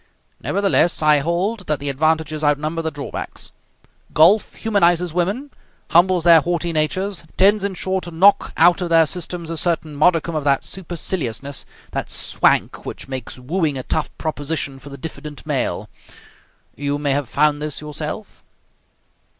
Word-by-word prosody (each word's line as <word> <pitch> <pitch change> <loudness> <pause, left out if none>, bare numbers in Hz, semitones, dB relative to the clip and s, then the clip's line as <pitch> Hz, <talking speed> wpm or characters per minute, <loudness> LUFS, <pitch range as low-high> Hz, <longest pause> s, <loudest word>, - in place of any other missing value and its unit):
Nevertheless, 195 -5 +1
I 150 -1 +5
hold 180 +7 -1
that 150 -2 0
the 145 - -5
advantages 155 +2 0
outnumber 155 +3 +1
the 160 - -2
drawbacks. 145 -2 -7 0.6
Golf 190 +8 +5
humanizes 180 -6 +2
women, 200 - -1 0.4
humbles 175 0 +4
their 165 -2 +7
haughty 170 +1 -1
natures, 185 +5 -1
tends, 200 +1 +4
in 200 -1 -2
short, 190 +1 -2
to - - -6
knock 195 +4 +4
out 175 +3 +5
of 175 - -2
their 165 -1 +5
systems 170 0 -3
a 165 - -3
certain 160 -2 -1
modicum 170 +2 +2
of 155 -2 -2
that 140 -1 +2
superciliousness, 150 - -4 0.2
that - - -3
swank, - - +1
which - - -7
makes 130 -3 -6
wooing 150 +2 -1
a 130 - -4
tough 155 - -1
proposition 145 -3 -3
for 140 +2 -11
the 140 - -9
diffident 150 -1 -8
male. - - -1 0.9
You 145 0 -2
may 145 -1 -1
have 140 -2 -1
found 150 +2 +2
this 150 -1 -3
yourself?" 150 +6 -6
160 Hz, 150 wpm, -20 LUFS, 145-180 Hz, 0.9 s, their